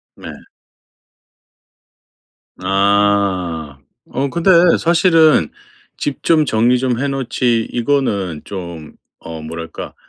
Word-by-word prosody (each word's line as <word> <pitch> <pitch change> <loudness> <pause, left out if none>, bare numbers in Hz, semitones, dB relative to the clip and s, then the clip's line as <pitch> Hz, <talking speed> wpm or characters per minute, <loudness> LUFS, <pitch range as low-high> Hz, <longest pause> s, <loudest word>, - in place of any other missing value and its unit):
네. - - -10 2.3
아. 95 -6 0 0.3
어 140 +2 -2
근데 170 +5 +1 0.3
사실은 165 - +3 0.5
"집 145 -2 -4
좀 155 -2 +3
정리 120 +1 +2
좀 125 -2 -1
해 140 - -1
놓지." 125 -3 -1
이거는 110 - -1
좀 85 -5 -8 0.3
어 80 -1 -7
뭐랄까 80 +1 -8
105 Hz, 145 characters per minute, -17 LUFS, 85-135 Hz, 2.3 s, 사실은